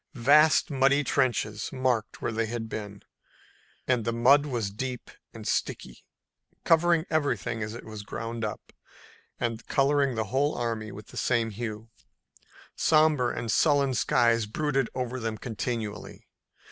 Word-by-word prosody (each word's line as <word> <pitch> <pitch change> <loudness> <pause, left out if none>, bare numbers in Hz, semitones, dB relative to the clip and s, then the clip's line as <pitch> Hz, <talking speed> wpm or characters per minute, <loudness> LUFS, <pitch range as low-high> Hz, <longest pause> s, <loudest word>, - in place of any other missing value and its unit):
Vast 150 +6 +5
muddy 140 +1 +3
trenches 115 -6 0
marked 130 -4 -1
where - - 0
they 115 0 -1
had 115 0 -4
been, 105 -2 -7 0.8
and 125 -3 +2
the 115 - -1
mud 135 +5 +4
was 115 -7 -2
deep 125 +4 -5 0.2
and - - -9
sticky, 60 - -3 0.6
covering 165 0 +3
everything 120 -7 -1
as 110 +1 -4
it 120 - -9
was 110 -1 -7
ground 115 +2 -5
up, 105 - -6 0.7
and 115 -1 -3
coloring 140 -1 +2
the 110 - 0
whole 145 +3 +2
army 115 -2 -3
the 105 0 -11
same 115 -2 +1
hue. 110 +1 -6 0.8
Somber 155 -6 +3
and 115 -1 -3
sullen 140 -4 +3
skies 115 -2 +2
brooded 135 +1 -1
over 130 0 -3
them 115 -2 -3
continually. 110 -3 -5
120 Hz, 135 wpm, -27 LUFS, 110-135 Hz, 0.8 s, Vast